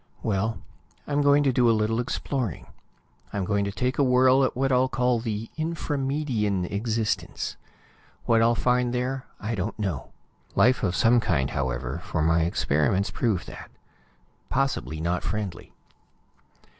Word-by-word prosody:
Well, 110 Hz, +1 st, -1 dB, 0.5 s
I'm 145 Hz, 0 st, 0 dB
going 145 Hz, 0 st, +5 dB
to 135 Hz, -2 st, +2 dB
do 120 Hz, -2 st, +4 dB
a 115 Hz, -, +4 dB
little 110 Hz, +2 st, 0 dB
exploring. 120 Hz, -, -3 dB, 0.7 s
I'm 100 Hz, -2 st, -2 dB
going 100 Hz, +1 st, +1 dB
to 100 Hz, -, -2 dB
take 125 Hz, +6 st, -2 dB
a -, -, +5 dB
whirl 130 Hz, +1 st, +5 dB
at 130 Hz, -, 0 dB
what 135 Hz, +1 st, +1 dB
I'll 130 Hz, 0 st, +3 dB
call 125 Hz, 0 st, +1 dB
the 110 Hz, -1 st, -4 dB
Infra 160 Hz, -1 st, -2 dB
Median 130 Hz, -9 st, 0 dB
existence. 110 Hz, +3 st, -2 dB, 0.7 s
What 115 Hz, -1 st, +4 dB
I'll 115 Hz, +1 st, +4 dB
find 125 Hz, +1 st, +1 dB
there, 130 Hz, +1 st, -2 dB
I 110 Hz, +3 st, -3 dB
don't 105 Hz, +1 st, -3 dB
know. 95 Hz, -, -3 dB, 0.5 s
Life 125 Hz, +2 st, +4 dB
of 95 Hz, -4 st, 0 dB
some 115 Hz, +6 st, +4 dB
kind, 70 Hz, -, 0 dB
however, 65 Hz, -2 st, -2 dB
for 80 Hz, -, -1 dB
my 80 Hz, +1 st, +3 dB
experiments 85 Hz, +3 st, +1 dB
prove 110 Hz, -7 st, 0 dB
that. -, -, -10 dB, 0.8 s
Possibly 135 Hz, -, -1 dB
not 85 Hz, +2 st, -1 dB
friendly. 100 Hz, -5 st, -4 dB
115 Hz, 150 wpm, -26 LUFS, 95-130 Hz, 0.8 s, going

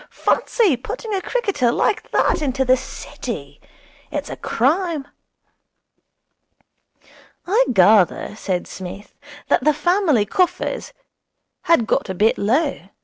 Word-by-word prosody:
Fancy 415 Hz, -, +1 dB
putting 430 Hz, -, -6 dB
a 385 Hz, -, -1 dB
cricketer 400 Hz, -, 0 dB
like 420 Hz, -, 0 dB
that -, -, +1 dB
into 265 Hz, -2 st, 0 dB
the 255 Hz, +1 st, +5 dB
City! 265 Hz, +1 st, -7 dB, 0.5 s
It's -, -, -4 dB
a -, -, -4 dB
crime.' 305 Hz, +3 st, 0 dB, 2.4 s
'I 440 Hz, +7 st, +3 dB
gather,' 205 Hz, -1 st, +3 dB
said 185 Hz, -4 st, -3 dB
Psmith, 190 Hz, +2 st, -9 dB, 0.3 s
'that -, -, +2 dB
the 305 Hz, -1 st, +3 dB
family 310 Hz, -, +2 dB
coffers 365 Hz, -, -1 dB, 0.7 s
had 330 Hz, -9 st, +4 dB
got -, -, 0 dB
a 190 Hz, -, -3 dB
bit 215 Hz, +5 st, +2 dB
low. 235 Hz, -, 0 dB
275 Hz, 115 wpm, -20 LUFS, 220-365 Hz, 2.4 s, the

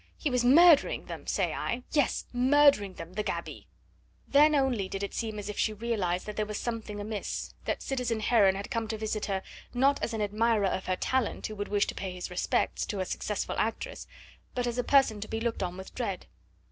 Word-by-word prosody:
He 295 Hz, -, -1 dB
was 250 Hz, -1 st, +2 dB
murdering 310 Hz, +4 st, +6 dB
them, -, -, -8 dB
say -, -, 0 dB
I 245 Hz, +1 st, -3 dB
yes, 290 Hz, -4 st, +1 dB
murdering 255 Hz, -6 st, +4 dB
them 165 Hz, +2 st, -9 dB
the 210 Hz, -, -1 dB
gaby!" -, -, -5 dB, 0.6 s
Then 300 Hz, +2 st, +5 dB
only 250 Hz, -9 st, +1 dB
did 195 Hz, 0 st, -4 dB
it 200 Hz, -, -4 dB
seem 220 Hz, -2 st, -3 dB
as 205 Hz, -1 st, -5 dB
if 210 Hz, -, -5 dB
she 215 Hz, -, +1 dB
realised 205 Hz, -5 st, -1 dB
that 210 Hz, -, -6 dB
there 215 Hz, -, +1 dB
was 210 Hz, 0 st, -4 dB
something 225 Hz, -3 st, -4 dB
amiss, 210 Hz, 0 st, -4 dB
that -, -, -2 dB
citizen 250 Hz, -4 st, -1 dB
Heron 205 Hz, -4 st, +4 dB
had 200 Hz, +1 st, -6 dB
come 230 Hz, -1 st, -1 dB
to 220 Hz, -, -3 dB
visit 215 Hz, 0 st, -2 dB
her, 195 Hz, -1 st, -2 dB, 0.3 s
not 275 Hz, +3 st, +3 dB
as 230 Hz, -, -2 dB
an 220 Hz, -, -2 dB
admirer 215 Hz, 0 st, +2 dB
of 190 Hz, 0 st, -1 dB
her 185 Hz, -, +1 dB
talent 260 Hz, +5 st, -1 dB
who 215 Hz, -, -4 dB
would 205 Hz, 0 st, -4 dB
wish 205 Hz, -1 st, +2 dB
to -, -, -4 dB
pay 190 Hz, -2 st, -5 dB
his 180 Hz, 0 st, -6 dB
respects 180 Hz, -, 0 dB
to 205 Hz, -, -3 dB
a 185 Hz, -, 0 dB
successful 210 Hz, +2 st, -3 dB
actress, 225 Hz, -, -3 dB, 0.5 s
but 245 Hz, -1 st, 0 dB
as 240 Hz, 0 st, -2 dB
a -, -, +1 dB
person 250 Hz, -6 st, +3 dB
to 215 Hz, -, -5 dB
be 225 Hz, -, -3 dB
looked 230 Hz, 0 st, -2 dB
on 180 Hz, -1 st, -3 dB
with 190 Hz, -, -9 dB
dread. 200 Hz, -7 st, -3 dB
220 Hz, 220 wpm, -29 LUFS, 200-245 Hz, 0.6 s, murdering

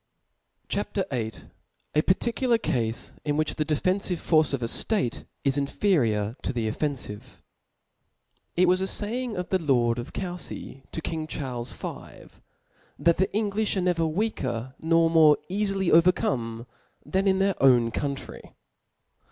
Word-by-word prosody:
CHAP. -, -, -3 dB, 0.2 s
VIIL 115 Hz, -3 st, -4 dB, 0.4 s
A 150 Hz, -, +4 dB
parttciilar 235 Hz, +6 st, +1 dB
Cafe 120 Hz, -, -2 dB
in 145 Hz, -1 st, 0 dB
which 155 Hz, -1 st, +1 dB
the 155 Hz, -, -1 dB
defenfive 180 Hz, +5 st, 0 dB
Force 155 Hz, -2 st, +3 dB
of 135 Hz, -3 st, -2 dB
a -, -, 0 dB
State 160 Hz, -, 0 dB, 0.2 s
is 140 Hz, 0 st, +2 dB
inferior 120 Hz, -, +1 dB
to -, -, -2 dB
the 115 Hz, -3 st, -2 dB
o£enfive^ 125 Hz, -3 st, -4 dB, 1.2 s
TT 180 Hz, -, +5 dB
was 185 Hz, +1 st, +3 dB
a -, -, +1 dB
faying 230 Hz, +3 st, -2 dB
of 180 Hz, 0 st, -3 dB
the 190 Hz, -2 st, +1 dB
lord 120 Hz, -5 st, +2 dB
of 120 Hz, +5 st, -6 dB
C(7/^fy*to 175 Hz, -5 st, -6 dB
king^ 160 Hz, -1 st, -3 dB
^ -, -, -32 dB
Charles 125 Hz, -5 st, -4 dB
V. -, -, -9 dB, 0.6 s
that 170 Hz, -1 st, +3 dB
the 190 Hz, -, +3 dB
Englijb 210 Hz, 0 st, -1 dB
are -, -, +1 dB
never 175 Hz, -2 st, +1 dB
weaker^ 135 Hz, -, -2 dB
nor 165 Hz, -2 st, +5 dB
eafier 195 Hz, -2 st, 0 dB
overcome 125 Hz, -9 st, +2 dB, 0.4 s
than 195 Hz, +1 st, 0 dB
in 190 Hz, -1 st, +4 dB
tt^ir 195 Hz, +1 st, +2 dB
owtt 120 Hz, -4 st, +5 dB
country. 140 Hz, -1 st, -5 dB
155 Hz, 140 wpm, -26 LUFS, 125-190 Hz, 1.2 s, TT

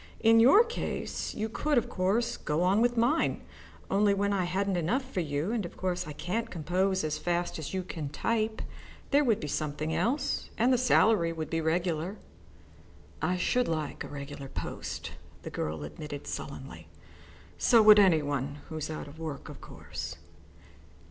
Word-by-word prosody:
In 225 Hz, 0 st, +6 dB
your 270 Hz, -, +8 dB
case 470 Hz, 0 st, -4 dB
you 215 Hz, 0 st, -1 dB
could, 290 Hz, +6 st, 0 dB
of 240 Hz, -, +2 dB
course, 200 Hz, +6 st, 0 dB
go 150 Hz, +3 st, -1 dB
on 195 Hz, +4 st, +3 dB
with 240 Hz, 0 st, +2 dB
mine, 245 Hz, +8 st, +2 dB, 0.5 s
only 200 Hz, 0 st, +4 dB
when 200 Hz, +1 st, +1 dB
I 190 Hz, -2 st, +1 dB
hadn't 195 Hz, +2 st, 0 dB
enough 215 Hz, -, 0 dB
for 190 Hz, -, 0 dB
you, 155 Hz, +3 st, -1 dB
and 230 Hz, -3 st, -1 dB
of 175 Hz, -, -8 dB
course 180 Hz, -4 st, -2 dB
I -, -, -5 dB
can't 225 Hz, +9 st, -3 dB
compose 185 Hz, +2 st, 0 dB
as 155 Hz, -1 st, -2 dB
fast 175 Hz, -1 st, -1 dB
as 155 Hz, -, -5 dB
you 185 Hz, -, -1 dB
can 160 Hz, -5 st, -5 dB
type, 220 Hz, +6 st, -1 dB, 0.5 s
there 290 Hz, +1 st, +5 dB
would 230 Hz, -6 st, +2 dB
be 150 Hz, -, -4 dB
something 155 Hz, +2 st, -2 dB
else, 270 Hz, +5 st, 0 dB
and 245 Hz, +3 st, +4 dB
the -, -, +4 dB
salary 220 Hz, -8 st, +4 dB
would 160 Hz, -2 st, -5 dB
be 165 Hz, 0 st, 0 dB
regular." 170 Hz, +3 st, -1 dB, 1.0 s
"I 180 Hz, -, +1 dB
should 250 Hz, +7 st, +1 dB
like 155 Hz, -3 st, -3 dB
a -, -, -7 dB
regular 140 Hz, -1 st, -7 dB
post," -, -, -5 dB, 0.3 s
the -, -, -6 dB
girl 75 Hz, -1 st, -3 dB
admitted 145 Hz, -, -7 dB
sullenly. -, -, -7 dB, 0.7 s
"So 230 Hz, -3 st, +6 dB
would 210 Hz, -1 st, +9 dB
any 175 Hz, -6 st, +5 dB
one 140 Hz, 0 st, -2 dB
who's 155 Hz, -2 st, -4 dB
out 155 Hz, -, -5 dB
of 145 Hz, +3 st, -12 dB
work, 155 Hz, -4 st, -6 dB
of -, -, -10 dB
course." -, -, -7 dB
180 Hz, 175 wpm, -29 LUFS, 155-225 Hz, 1.0 s, would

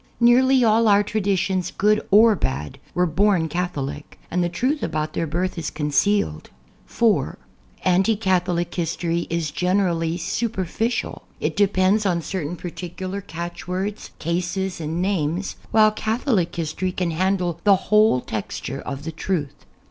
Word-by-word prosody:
Nearly 255 Hz, +2 st, +5 dB
all 225 Hz, 0 st, +4 dB
our 205 Hz, 0 st, +5 dB
traditions, 190 Hz, -3 st, 0 dB
good 210 Hz, +1 st, +3 dB
or 215 Hz, +2 st, +6 dB
bad, 75 Hz, -, -3 dB, 0.2 s
were 180 Hz, -, +3 dB
born 180 Hz, 0 st, +2 dB
Catholic, 150 Hz, -4 st, -4 dB
and 180 Hz, +1 st, +1 dB
the 175 Hz, -, 0 dB
truth 255 Hz, -, -1 dB
about 155 Hz, -1 st, -2 dB
their 165 Hz, -, -1 dB
birth 175 Hz, +3 st, -2 dB
is 160 Hz, -, -3 dB
concealed. 150 Hz, -, 0 dB, 0.4 s
(4) 230 Hz, -3 st, +1 dB, 0.5 s
Anti 190 Hz, +4 st, +3 dB
Catholic 180 Hz, -4 st, 0 dB
history 170 Hz, 0 st, -1 dB
is 165 Hz, -3 st, -1 dB
generally 175 Hz, -3 st, 0 dB
su|)erficial; 225 Hz, +4 st, -2 dB, 0.2 s
it -, -, -1 dB
depends 200 Hz, +1 st, +3 dB
on 170 Hz, -3 st, 0 dB
certain 175 Hz, -2 st, -3 dB
particular 185 Hz, +3 st, -6 dB
catchwords, 180 Hz, +4 st, -5 dB
cases 180 Hz, +2 st, -2 dB
and 160 Hz, +3 st, -2 dB
names, 185 Hz, -1 st, -1 dB
while 215 Hz, -1 st, +5 dB
Catholic 220 Hz, -, 0 dB
history 170 Hz, +3 st, -2 dB
can 180 Hz, -2 st, -1 dB
handle 180 Hz, 0 st, 0 dB
the 200 Hz, -2 st, +6 dB
whole 210 Hz, -, +3 dB
tex 110 Hz, -4 st, -5 dB
ture 135 Hz, +2 st, -5 dB
of 140 Hz, 0 st, -6 dB
the 165 Hz, -, -4 dB
truth. 160 Hz, -3 st, -2 dB
180 Hz, 140 wpm, -22 LUFS, 165-205 Hz, 0.5 s, or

